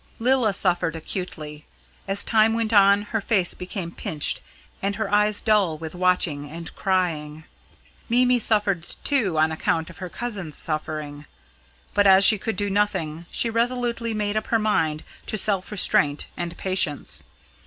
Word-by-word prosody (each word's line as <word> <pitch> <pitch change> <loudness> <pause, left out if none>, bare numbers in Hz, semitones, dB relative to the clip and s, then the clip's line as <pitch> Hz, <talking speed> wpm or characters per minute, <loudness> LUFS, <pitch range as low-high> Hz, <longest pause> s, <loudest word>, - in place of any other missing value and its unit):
Lilla 245 -2 +2
suffered 175 -4 +1
acutely. 155 -3 -7 0.4
As 195 +1 +3
time 225 0 +3
went 230 -1 -1
on, 200 0 +5
her 225 - +1
face 195 -4 +1
became 180 -2 -6
pinched, 150 -3 -2 0.4
and 200 +1 -1
her 215 -1 -3
eyes 210 0 +2
dull 200 -7 +2
with 160 0 -7
watching 175 -5 0
and 165 +2 -8
crying. 160 -5 -1 0.7
Mimi 250 +1 +3
suffered 205 -5 +1 0.2
too 220 - +1
on 155 +1 +3
account 160 +1 -1
of 180 - -16
her 185 -2 -6
cousin's 195 -5 -3
suffering. 155 -2 -3 0.7
But 205 -1 +4
as 190 +1 +7
she 215 0 +6
could 225 +1 -3
do 205 +1 -1
nothing, 175 -5 -1
she 230 - +1
resolutely 235 -1 -1
made 210 -1 -2
up 215 - -2
her 230 - +2
mind 160 -8 0 0.2
to 215 - -2
self 195 -2 +2
restraint 150 -7 +2
and 175 0 -5
patience. 185 -6 -1
190 Hz, 155 wpm, -23 LUFS, 160-215 Hz, 0.7 s, as